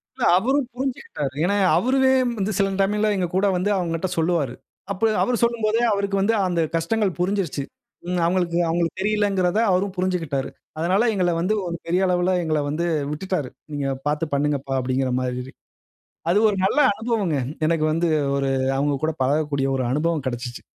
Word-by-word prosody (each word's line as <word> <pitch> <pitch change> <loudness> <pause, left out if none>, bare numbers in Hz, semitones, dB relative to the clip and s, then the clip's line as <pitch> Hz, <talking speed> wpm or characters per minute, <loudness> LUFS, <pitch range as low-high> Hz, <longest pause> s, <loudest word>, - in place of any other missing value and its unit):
இல்ல. 255 - -4
அவரும் 265 +6 +1
புரிஞ்சிக்கிட்டாரு. 245 - -3
ஏன்னா, 200 +4 +2 0.2
அவருவே 265 +1 +3 0.3
வந்து 200 +2 0
சில 195 -1 +2
டைம்ல 210 +2 +2
எங்க 180 -2 0
கூட 190 - +2
வந்து 185 +3 0
அவுங்ககிட்ட 170 0 -1
சொல்லுவாரு. 160 -6 +1 0.4
அப்ப 210 +3 +1
அவரு 250 - +1
சொல்லும்போதே 230 -1 +1
அவருக்கு 200 0 -1
வந்து 210 +4 +2
அந்த 170 -2 0
கஷ்டங்கள் 195 +4 +1
புரிஞ்சிருச்சு. 180 -5 -1 0.4
ம் 180 0 -1
அவுங்களுக்கு 175 -1 +1
அவுங்களுக்கு 170 +2 -1
தெரியலங்கிறத 205 -2 +1
அவரும் 190 +1 +1
புரிஞ்சிக்கிட்டாரு. 165 -7 -1 0.3
அதனால 185 +8 +2
எங்கள 180 -3 +1
வந்து 185 +5 +1
ஒரு 170 - -3
பெரிய 180 +3 +1
அளவுல 180 0 +1
எங்கள 155 -2 0
வந்து 165 +4 -1 0.3
விட்டுட்டாரு. 155 -3 -3 0.2
"நீங்க 145 -2 -2 0.2
பார்த்து 150 +1 -1
பண்ணுங்கப்பா." 140 -1 0
அப்பிடிங்கிற 130 0 0
மாதிரி. 125 +1 -4 0.8
அது 190 +4 +4
ஒரு 205 - -1
நல்ல 205 - +2
அனுபவங்க. 215 -7 -1 0.3
எனக்கு 160 -1 +1
வந்து 165 +2 +1 0.3
ஒரு 135 -1 0 0.3
அவுங்க 145 +1 +1
கூட 160 - +2
பழகக்கூடிய 140 0 0
ஒரு 130 - -1
அனுபவம் 150 +1 0
கிடச்சிச்சு. 120 -1 -5
175 Hz, 155 wpm, -23 LUFS, 150-200 Hz, 0.8 s, அது